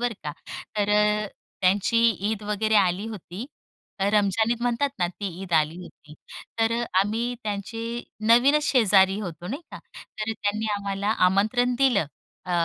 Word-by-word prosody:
बरं 240 -2 -1
का 150 - -3 0.4
तर 205 -1 +1 0.3
अ, - - -4 0.3
त्यांची 195 +4 +2 0.3
ईद 215 -1 -3
वगैरे 210 +1 0
आली 195 +1 +2
होती 210 +1 -8 0.5
रमजान 205 +2 +2
ईद 235 0 -1
म्हणतात 245 +3 +1
ना 175 - +2
ती 200 +3 -6 0.2
ईद 180 - -8
आली 155 0 +2
होती 150 -3 -14 0.4
तर 225 0 +2
अ, - - -1 0.2
आम्ही 225 +5 -1
त्यांचे 210 +2 -4 0.5
नवीनच 275 +6 +5
शेजारी 195 -6 +4
होतो 175 -3 -7
नाही 275 - -5
का - - -8 0.2
तर 215 +1 -5
त्यांनी 215 0 -2
आम्हाला 200 0 -2 0.2
आमंत्रण 230 +6 +1
दिलं 245 - +3 0.4
अ, 180 - -7
210 Hz, 150 wpm, -25 LUFS, 195-230 Hz, 0.5 s, नवीनच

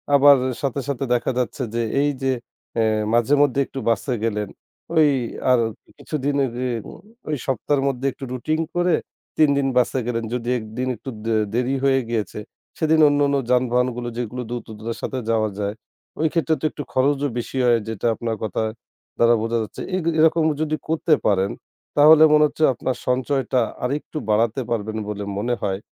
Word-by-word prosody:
আবার 140 0 +8 0.3
সাথে, 140 -1 -1
সাথে 140 -1 -2
দেখা 120 +2 +1
যাচ্ছে 125 +1 -2
যে 120 - +1 0.2
এই 145 - +2
যে 135 - +2 0.5
এ - - +3 0.3
মাঝে-মধ্যে 140 +3 +3
একটু 135 - -7
বাসে 120 +3 0
গেলেন, 105 -3 -1 0.5
ওই 155 -2 +6 0.4
আর 125 - +5 0.4
কিছুদিন 145 -2 -2
এর 125 - -4 0.8
ওই 150 - +1
সপ্তাহের 135 +1 0
মধ্যে 135 -1 -2
একটু 135 - -12
রুটিন 155 +6 -1 0.2
করে 175 0 +3 0.4
৩ 155 -2 +5
দিন 140 -1 +1
বাসে 125 +1 +2
গেলেন। 115 -1 -1
যদি 120 -1 -2
একদিন 110 +3 -5
একটু 125 - -8 0.2
দে 115 - +1 0.2
দেরি 125 +3 0
হয়ে 135 -1 +3
গিয়েছে 110 -3 -2 0.4
সেদিন 160 0 +2
অন্যান্য 145 -1 +2 0.2
যানবাহনগুলো 125 -1 +1
যেগুলো 125 +1 -3
দ্রুততার 115 -1 -6
সাথে 130 - -3
যাওয়া 110 -1 +1
যায় 100 0 -2 0.4
ঐ - - -1
ক্ষেত্রে 165 -2 +2
তো - - -2
একটু 145 - -6
খরচও 140 +2 +2
বেশি 120 +2 -4
হয়। 120 -1 +4
যেটা 110 +1 -2
আপনার 115 -1 -3
কথা 110 0 -2 0.6
দ্বারা 120 0 +5
বোঝা 115 +1 0
যাচ্ছে। 110 - -8
এই - - +1 0.2
এরকম 160 +1 +4 0.2
যদি 155 0 0
করতে 160 0 +2
পারেন 100 -1 +2 0.5
তাহলে 155 +2 +8
মনে 150 0 +6
হচ্ছে 155 - -3
আপনার 125 +1 -2
সঞ্চয়টা 130 0 +1 0.2
আরেকটু 145 +4 -3
বাড়াতে 115 +4 +2
পারবেন 110 -1 -2
বলে 105 -1 -4
মনে 120 +4 0
হয়। 95 -2 -1
125 Hz, 165 wpm, -22 LUFS, 115-145 Hz, 0.8 s, আবার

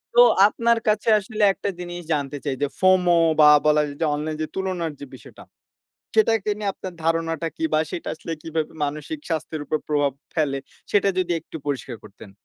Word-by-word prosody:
তো 485 - +8 0.3
আপনার 235 +2 +1
কাছে 215 +1 +2
আসলে 215 +1 -3
একটা 200 - -4
জিনিস 175 0 -6
জানতে 145 -1 -2
চাই 140 -2 -1
যে, 145 - +2
FOMO 185 -2 +4 0.3
বা 150 - +8 0.2
বলা 150 0 +4 0.2
যে, 165 - +1
অনলাইন 155 +1 -3
যে, - - 0
তুলনার 185 -4 -2
যে, 140 - -7
বিষয়টা - - -14 0.7
সেটাকে 225 - +3
নিয়ে 205 -2 -1
আপনার 185 - -7
ধারণাটা 165 0 0
কি 325 - -3
বা - - +4
সেটা 170 - -5
আসলে 160 +1 -7
কিভাবে 160 -1 -3
মানসিক 150 - -5
স্বাস্থ্যের 155 -1 -3
উপর 155 - -1
প্রভাব 145 -2 +1 0.2
ফেলে? 145 -4 0 0.3
সেটা 200 -1 +3
যদি 180 -1 0
একটু 160 - -10
পরিষ্কার 135 -3 -3
করতেন। 100 0 -13
165 Hz, 180 wpm, -23 LUFS, 150-190 Hz, 0.7 s, তো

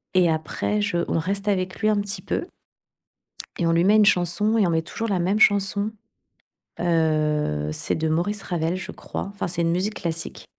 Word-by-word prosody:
Et 180 -2 +5
après 160 +6 -1
je 205 -4 0
on - - +1
reste 195 +4 -3
avec 185 -2 -1
lui, 215 - +3
un 210 -1 +2
petit 200 0 -4
peu. - - -2 1.1
Et 175 - 0
on 165 - +3
lui 170 +1 +3
met 205 +3 +5
une 215 -1 +6
chanson 205 +4 +2
et 200 -5 +3
on - - 0
met 160 -1 +1
toujours 225 +7 -5
la 190 -4 0
même 190 +5 +1
chanson. 205 0 +3 0.9
Heu, 155 - +1
c'est - - -2
de 160 0 -1
Maurice 195 +6 -1
Ravel, 170 0 -1
je 190 - -6
crois. - - -6
Enfin, 200 - -3
c'est 170 0 -2
une 165 0 +1
musique 200 +5 -1
classique. 165 -3 -4
180 Hz, 200 wpm, -24 LUFS, 165-205 Hz, 1.1 s, une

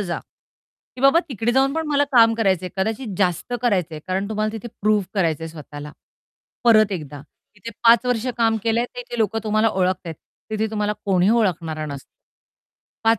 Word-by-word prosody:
जा, 175 -4 -3 0.8
की - - -9
बाबा 275 +5 +6
"तिकडे 235 -1 -1
जाऊन 270 +1 +3
पण 320 -1 -2
मला 285 0 +3
काम 225 -2 +6
करायचंय, 190 -5 0
कदाचित 215 +2 -2
जास्त 185 +5 0
करायचंय." 180 -9 0
कारण 190 +2 -2
तुम्हाला 215 0 -1
तिथे 225 +2 -6
प्रूव्ह 210 -2 +2
करायचंय 165 -4 0
स्वतःला. 150 -1 -9 0.7
परत 215 -3 +5
एकदा 150 -5 -6 0.4
इथे 210 +5 -8
5 235 +1 +6
वर्ष 245 -1 0
काम 225 -1 +2
केलंय 230 +1 +1
ते - - -5
इथे 240 - -7
लोकं 220 0 +1
तुम्हाला 215 +1 +2
ओळखता 185 -3 -1
आहेत, 160 - -5 0.4
तिथे 220 0 0
तुम्हाला 210 -1 -1
कोणी 190 -1 +2
ओळखणारं 165 -9 0
नसतं. 140 -2 -7 1.0
5 225 -1 +4
215 Hz, 170 wpm, -22 LUFS, 180-230 Hz, 1.0 s, बाबा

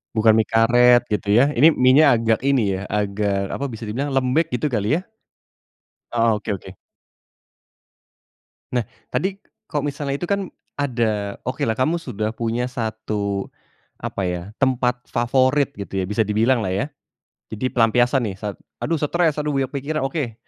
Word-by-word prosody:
Bukan 110 0 +5
mie 110 - +4
karet, 120 +2 +5
gitu 105 0 -2
ya? 135 +7 +4
Ini 155 +7 +7
mienya 140 +3 +5
agak 115 +1 +1
ini 125 -8 +2
ya 95 - -5
agak 100 -1 0
apa, 140 - -3
bisa 110 0 -7
dibilang 135 +7 -2
lembek, 135 +5 +1
gitu 135 +5 0
kali 120 - 0
ya? - - -9 1.1
Oh, 115 -2 +3
oke - - -6
oke. 95 - -12 2.0
Nah, 120 -4 -1 0.2
tadi 190 +1 -1 0.3
kalau 145 -2 -2
misalnya 145 -1 -2
itu 140 - -5
kan 200 +1 -1 0.3
ada, 110 -7 -1
okelah 115 -3 -1
kamu 155 +8 +1
sudah 110 -7 -3
punya 115 +2 -2
1, 110 -4 -3 0.5
apa 95 - -2
ya, 90 -1 -2 0.2
tempat 125 -2 +1
favorit 130 +4 +2
gitu 95 -1 -3
ya, - - -1
bisa 105 +2 0
dibilang 115 +5 +2
lah, 95 -4 -2
ya. 115 +8 0 0.7
Jadi 120 +4 -1
pelampiasan 120 +2 +3
nih 100 -3 -4
saat, 105 -2 -4 0.2
"Aduh 165 +1 0
stres, 155 +1 +1
aduh 150 0 -1
banyak 135 -1 0
pikiran" 145 +2 -3
oke. 135 -3 -2
120 Hz, 155 wpm, -22 LUFS, 110-140 Hz, 2.0 s, Ini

